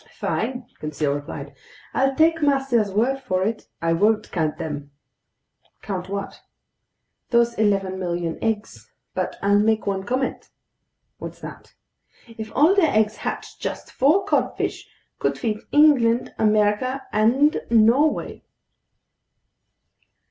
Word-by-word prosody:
"Fine," 250 +1 -2
Conseil 150 -1 -1
replied, 145 0 -6 0.4
"I'll 270 0 +1
take 325 +2 +3
master's 270 -7 +2
word 240 +7 +1
for 185 -8 -1
it. 220 +3 -3 0.2
I 165 0 +2
won't 210 +5 +1
count 160 -4 -1
them." 145 -2 -5 0.9
"Count 190 -2 -4
what?" 200 0 -5 0.9
"Those 235 -1 +3
11,000,000 185 -5 -1
eggs. 220 -1 -3 0.2
But - - -2
I'll 200 +1 +4
make 220 +1 +2
one 195 -1 -1
comment." 255 +5 -2 0.7
"What's - - -8
that?" - - -11 0.5
"If 220 -2 -8
all 315 +6 +5
their 375 -7 +3
eggs 215 0 +1
hatched, - - -5
just - - -5
four 315 +9 +3
codfish 410 - -1 0.3
could - - 0
feed 215 -3 -2
England, 255 -6 +4
America, 215 +5 +2
and 250 +8 +3
Norway." 235 +7 +3
220 Hz, 115 wpm, -23 LUFS, 195-265 Hz, 0.9 s, all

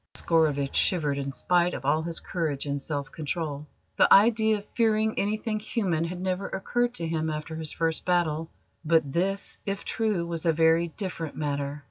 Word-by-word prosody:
Oscarovitch 150 -4 +1
shivered 150 -6 +2
in 140 0 -3
spite 175 +4 +1
of 130 - -7
all 150 +3 +3
his 165 0 -3
courage 155 -6 -2
and 140 -1 -2
self 140 -2 -3
control. 150 -2 -4 0.3
The - - +5
idea 220 +1 +6
of 205 - -10
fearing 220 -1 +2
anything 215 +1 -1
human 185 -7 -1
had 175 +1 -5
never 185 +1 -2
occurred 240 +5 -1
to 165 - -3
him 160 -1 -1
after 155 +1 -4
his 160 -1 -5
first 165 -1 -1
battle; 165 -3 0 0.3
but 160 -4 +2
this, 195 +3 -1
if 200 0 -4
true, 215 -6 0
was 170 -1 -3
a 165 - +4
very 165 +2 +4
different 170 -3 -5
matter. 145 -1 -2
165 Hz, 175 wpm, -27 LUFS, 150-195 Hz, 0.3 s, idea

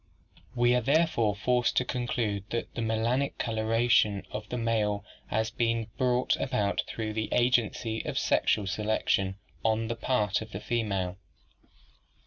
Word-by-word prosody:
"'We 120 0 +4
are 125 - +3
therefore 135 -6 +2
forced 125 +3 +1
to 125 - +3
conclude 120 -6 -2
that 115 - -3
the - - -3
melanic 115 +5 0
coloration 110 -2 +2
of 105 0 -6
the 125 - -3
male 105 -3 0 0.2
has 110 +1 -1
not - - -29
been 115 -1 +1
brought 125 -1 +2
about 105 -6 0
through 110 -1 -4
the 110 0 -2
agency 120 -2 +1
of - - -4
sexual 105 - +2
selec 105 +3 -1
tion 95 -1 +2 0.3
on 110 0 +1
the 115 - -1
part 115 -5 0
of 110 -1 -9
the 95 - -4
female. 100 -6 -1
110 Hz, 150 wpm, -29 LUFS, 105-120 Hz, 0.3 s, We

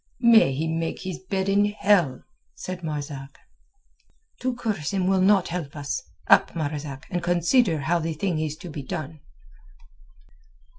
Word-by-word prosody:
"May 225 - +6
he 160 +4 -1
make 165 0 -2
his 185 -2 -5
bed 190 0 -2
in 200 +1 +4
hell!" 200 -8 +2 0.3
said 180 -1 -6
Marzak. 145 -3 -5 1.0
"To 255 -1 -1
curse 210 -11 -2
him 190 -2 +1
will 190 0 +3
not 195 -1 +4
help 165 -5 -5
us. 145 -1 -3 0.2
Up, - - +5
Marzak, 145 -2 -4
and 175 -1 -1
consider 175 - +2
how 170 +5 +1
the 165 0 -2
thing 170 0 -1
is 155 -1 -2
to 175 +2 -10
be 150 - -5
done." 155 +3 -6
170 Hz, 150 wpm, -25 LUFS, 150-190 Hz, 1.0 s, May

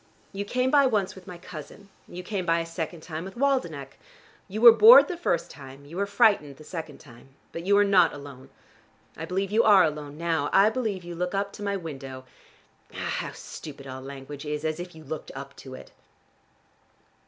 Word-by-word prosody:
You 200 +1 -4
came 250 +4 0
by 280 -2 +5
once 210 -6 0
with 190 -1 -15
my 180 - -8
cousin. 180 +3 -11 0.2
You 180 +1 -8
came 190 0 -3
by 165 -1 +2
a 165 - -3
second 165 0 -5
time 160 -1 -6
with 190 +1 -9
Waldenech. 170 - -1 0.5
You 205 +3 -5
were 235 -1 +11
bored 450 - +9
the 360 - -4
first 335 - -1
time, 135 -1 -12
you 155 +4 -11
were 200 +2 -1
frightened 200 - +2
the 155 - -13
second 160 -2 -7
time. 135 0 -17 0.2
But 170 +2 -7
you 200 - +5
were 205 - +5
not 185 -4 +4
alone. 140 -2 -11 0.7
I 160 - -6
believe 190 +3 -2
you 220 +2 +4
are 205 -4 +6
alone 150 -2 -3
now: 165 -3 -1
I 200 +3 +5
believe 220 -7 -3
you 175 0 -7
look 180 +3 -3
up 200 0 -2
to - - -11
my 200 -1 -1
window. 135 -6 -8 0.7
Ah, - - -17 0.2
how - - -5
stupid 140 -3 -10
all 130 0 -8
language 140 +1 -9
is! 150 0 -4
As 155 +1 -2
if 175 -1 -8
you 160 - -12
looked 155 0 -7
up 140 +1 -8
to 130 -1 -10
it!" - - -13
170 Hz, 205 wpm, -26 LUFS, 145-200 Hz, 0.7 s, were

